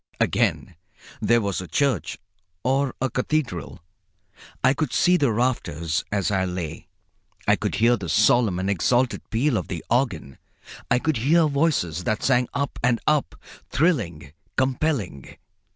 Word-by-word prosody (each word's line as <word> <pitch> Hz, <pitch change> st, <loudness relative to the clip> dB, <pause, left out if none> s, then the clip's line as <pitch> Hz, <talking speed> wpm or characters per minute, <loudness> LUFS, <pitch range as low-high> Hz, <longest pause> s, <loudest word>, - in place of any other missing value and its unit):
Again 90 Hz, -, 0 dB, 0.5 s
there 120 Hz, +2 st, +3 dB
was 100 Hz, -3 st, -2 dB
a 90 Hz, -, -8 dB
church 135 Hz, -, 0 dB, 0.5 s
or 135 Hz, +1 st, +1 dB
a 130 Hz, -, +1 dB
cathedral. 125 Hz, -, -2 dB, 0.8 s
I -, -, +5 dB
could 145 Hz, -1 st, -2 dB
see 180 Hz, -, +4 dB
the 140 Hz, -8 st, +2 dB
rafters 85 Hz, -, -1 dB
as 100 Hz, -2 st, 0 dB
I 95 Hz, -2 st, +1 dB
lay. 90 Hz, -4 st, -5 dB, 0.6 s
I -, -, +5 dB
could -, -, -3 dB
hear 120 Hz, +2 st, +4 dB
the 95 Hz, -5 st, -6 dB
solemn 110 Hz, +2 st, +3 dB
and 95 Hz, +1 st, -2 dB
exalted 120 Hz, +7 st, +1 dB
peal 120 Hz, +2 st, +1 dB
of 95 Hz, -, -3 dB
the 85 Hz, -4 st, -6 dB
organ. 100 Hz, -, -1 dB, 0.5 s
I 120 Hz, -, +4 dB
could 155 Hz, +1 st, 0 dB
hear 155 Hz, +8 st, +3 dB
voices 140 Hz, -, 0 dB
that 110 Hz, -, -1 dB
sang 125 Hz, -2 st, +2 dB
up 140 Hz, 0 st, -3 dB
and 120 Hz, -1 st, +2 dB
up, 150 Hz, -, +1 dB, 0.3 s
thrilling, 105 Hz, -, 0 dB, 0.2 s
compelling. 130 Hz, -, -1 dB
120 Hz, 145 wpm, -24 LUFS, 90-135 Hz, 0.8 s, I